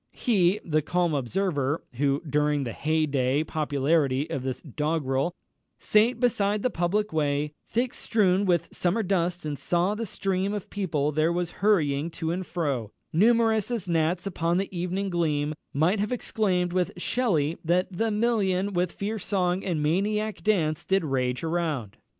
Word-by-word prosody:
He, 200 -5 +2
the 155 -2 +1
calm 175 +1 0
observer, 145 +1 -1
who 140 +2 +1
during 150 0 +1
the 120 -3 -4
hey 155 +1 +1
day 140 0 +1
popularity 145 -2 +1
of 140 - -2
this 130 -1 -3
doggrel, 150 -1 -1 0.5
"Sate 225 +4 +3
beside 210 -4 +1
the 255 - +1
public 200 +4 0
way, 150 -1 0
Thick 245 +2 -1
strewn 200 -3 +2
with 175 -3 +1
summer 190 +6 +1
dust, 175 -3 0
and 145 -2 -3
saw 175 +3 +1
the 225 +1 -4
stream 195 +1 -1
Of 205 - -6
people 155 -8 -1
there 155 +2 +2
was 175 0 -1
hurrying 160 -7 +2
to 160 0 -1
and 185 +2 -2
fro, 140 - -2 0.2
Numerous 220 +3 +3
as 230 -7 -3
gnats 170 +2 +1
upon 170 -3 0
the 195 0 -3
evening 185 +3 -2
gleam," 155 -3 0 0.2
might 165 +8 +2
have 210 +3 -1
exclaimed 185 -7 0
with 180 -1 0
Shelley, 175 - 0
that 180 +3 +1
"The 225 +5 +1
million, 205 -3 +1
with 180 -1 0
fierce 210 0 -4
song 185 -2 0
and 165 -6 -1
maniac 210 +7 0
dance, 165 -8 +1
Did 190 -3 +1
rage 130 -2 -1
around." 160 - -2
175 Hz, 160 wpm, -26 LUFS, 150-200 Hz, 0.5 s, Sate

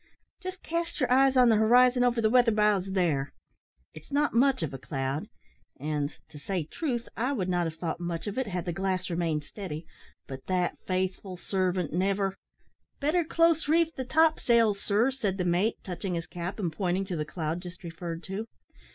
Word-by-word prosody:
Just 370 0 -7
cast 335 +1 -3
your 255 -3 +1
eyes 265 +1 +5
on 250 -1 +7
the 220 - +5
horizon 245 +3 +5
over 245 -1 +2
the 220 - +3
weather 245 -1 +5
bows 210 -3 +2
there; 155 -7 +1 0.6
it's 155 0 -13
not 290 +1 +2
much 255 -4 +3
of 145 - -3
a 135 - -6
cloud, 135 +2 -3 0.5
and, 150 0 -1 0.2
to 150 - -11
say 180 +3 -2
truth, 240 - -3
I 250 +5 0
would 190 -9 -1
not 175 -2 +1
have 160 - -6
thought 165 0 -3
much 170 -1 -3
of 205 -1 -4
it 260 - -1
had 180 -2 -3
the 175 - -2
glass 190 0 -1
remained 165 -3 0
steady, 160 -2 -7 0.4
but 135 -1 -9
that 180 -1 0
faithful 185 0 -2
servant 185 -3 -1
never 195 +2 +1 0.3
" - - -45
"Better 310 +5 +2
close 330 -1 +2
reef 325 +1 +3
the 260 - -4
top 315 +4 +3
sails, 230 -4 +3
sir," 220 +6 +2
said 205 -8 -2
the 180 - -1
mate, 180 +6 +2
touching 180 0 -4
his 165 -1 -3
cap, 175 +1 -5
and 175 -7 -2
pointing 185 +2 0
to 185 -2 -4
the 155 - -1
cloud 160 +2 -3
just 180 +2 -10
referred 170 0 -6
to. 200 +4 -5
190 Hz, 195 wpm, -28 LUFS, 170-245 Hz, 0.6 s, on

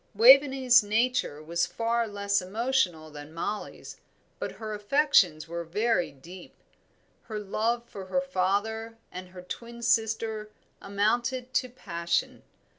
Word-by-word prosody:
Waveney's 260 +1 +7
nature 215 -7 0
was 170 +2 0
far 230 0 -1
less 200 -1 0
emotional 185 -6 -1
than 145 0 -10
Mollie's, 205 +5 -5 0.4
but - - -4
her 215 -1 -6
affections 205 - +3
were 170 +1 -4
very 205 +2 0
deep. 170 +7 -13 0.7
Her 220 -2 -5
love 225 +4 -1
for 195 -4 -9
her 270 - +1
father 220 -1 -1
and 180 0 -8 0.2
twin 235 +2 -8
sister 220 -2 0 0.3
amounted 240 +5 -1
to 255 - +1
passion. 170 -8 -2
215 Hz, 115 wpm, -28 LUFS, 185-235 Hz, 0.7 s, Waveney's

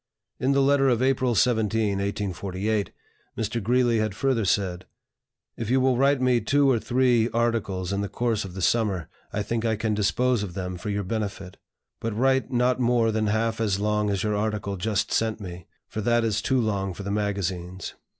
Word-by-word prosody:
In 135 +2 +2
the 140 0 +3
letter 135 0 +4
of 120 0 +2
April 130 -2 +2
17, 110 -3 +2
1848, 100 +1 -2 0.5
Mr. 115 +1 -2
Greeley 120 +1 +2
had 110 -3 -1
further 125 -1 +1
said: 90 -2 0 0.7
"If 115 -2 -4
you 130 +2 +3
will 130 -1 +3
write 140 +2 +3
me 125 -2 +2
two 140 +6 +3
or 120 - +2
three 120 -1 +2
articles 110 -6 -1
in 100 - -1
the 100 - -3
course 115 0 -1
of 95 -2 -9
the 95 - -4
summer, 100 -8 +1 0.2
I 105 0 -2
think 115 +2 -2
I 110 -1 +1
can 110 0 -1
dispose 120 +3 +1
of 95 -4 -5
them 90 -1 -4
for 105 - -5
your 100 0 -1
benefit. 100 -2 -4 0.4
But 110 -2 -3
write 130 +2 +2
not 125 +1 +2
more 120 -2 +2
than 110 0 0
half 115 +1 0
as 100 -3 +1
long 105 0 +1
as 100 -2 -1
your 105 -1 0
article 105 -1 -2
just 105 +2 -1
sent 110 -1 0
me, 90 -4 -8 0.2
for 110 - -5
that 120 +1 +2
is 110 -2 0
too 130 - +1
long 100 -5 -1
for 100 - -7
the 100 - -3
magazines. 95 -3 -3
110 Hz, 195 wpm, -25 LUFS, 100-120 Hz, 0.7 s, letter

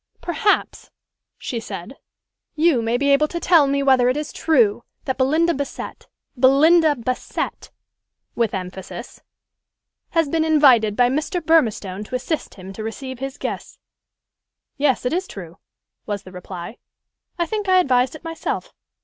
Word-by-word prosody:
"Perhaps," 350 +4 0 0.5
she 235 - -4
said, 200 +2 -8 0.6
"you 310 -5 +3
may 230 +1 0
be 280 +2 +2
able 300 +2 +3
to 340 - -4
tell 330 -4 +5
me 280 0 0
whether 260 -2 +4
it 255 - 0
is 300 0 -4
true 240 -9 +2 0.2
that 260 0 -2
Belinda 315 +6 +3
Bassett 280 -1 -6 0.3
Belinda 295 +5 +5
Bassett," 255 0 -4 0.6
with 230 -4 0
emphasis, 185 0 -7 0.9
"has 330 -3 +1
been 320 +2 +1
invited 265 -9 +4
by 245 +1 +4
Mr. 300 +7 -1
Burmistone 220 - +1
to 255 - -5
assist 300 +5 -3
him 190 0 -10
to 215 - -7
receive 260 +3 -6
his 270 +1 -5
guests." - - -5 1.0
"Yes, 275 -3 +1
it 250 - 0
is 370 +2 -1
true," 175 -4 -10 0.5
was 205 -1 -3
the 185 - -12
reply: 180 +3 -8 0.6
"I 345 - +1
think 420 0 -3
I 370 - +5
advised 255 -5 +2
it 310 - -12
myself. 330 -1 -4
265 Hz, 150 wpm, -21 LUFS, 225-315 Hz, 1.0 s, tell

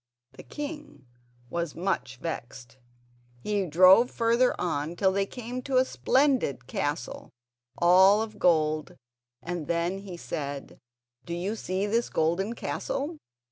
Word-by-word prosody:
The - - -12
king 295 - -8 0.5
was 170 -3 -3
much 160 -8 -2
vexed; 125 -4 -7 0.6
he 205 -3 0
drove 185 +9 +6
further 235 +2 +2
on 160 -1 -2
till 190 +1 +2
they 195 +1 0
came 250 +2 -6
to 260 0 0
a 255 - +5
splendid 260 - +1
castle, 145 0 -4 0.5
all 190 +5 +6
of 215 -1 -9
gold, 155 -3 +2 0.5
and 170 -3 -4
then 170 +3 -1
he 195 -3 -8
said: 145 -4 -6 0.4
"Do 170 - -5
you 190 +5 -2
see 190 -2 -2
this 230 +3 0
golden 180 +8 0
castle? 335 - -4
185 Hz, 130 wpm, -27 LUFS, 160-230 Hz, 0.6 s, drove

